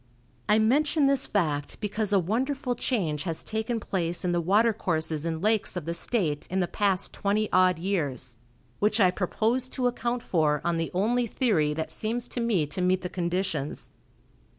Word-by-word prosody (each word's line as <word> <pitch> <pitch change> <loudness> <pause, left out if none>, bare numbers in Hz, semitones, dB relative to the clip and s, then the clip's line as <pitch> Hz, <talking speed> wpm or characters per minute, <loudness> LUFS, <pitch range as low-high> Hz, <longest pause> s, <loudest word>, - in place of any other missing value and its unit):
I 210 - +5
mention 285 +7 +3
this 275 -1 +3
fact 150 -8 -1
because 210 0 -2
a 200 - +5
wonderful 250 - -1
change 185 - -1
has 165 -2 -3
taken 220 +2 -2
place 175 -4 -2
in 180 - +1
the 175 0 +1
watercourses 175 -6 +1
and 160 +1 -3
lakes 215 -3 +1
of 170 - -4
the 170 - -2
state 170 -6 -1
in 190 - -1
the 180 - +1
past 195 0 0
twenty 210 +2 0
odd 185 -2 +4
years, 145 - -2 0.4
which 215 +2 +2
I 185 -3 +5
propose 225 +7 -1
to 255 -1 -2
account 240 0 -1
for 150 -4 +1
on 170 -1 +1
the 165 0 -1
only 235 +6 +1
theory 175 - +1
that 160 0 -3
seems 235 +2 -2
to - - -4
me 215 -10 +2
to 150 +5 -5
meet 185 +1 +2
the 180 - -3
conditions. 175 -5 -2
190 Hz, 175 wpm, -27 LUFS, 165-225 Hz, 0.4 s, I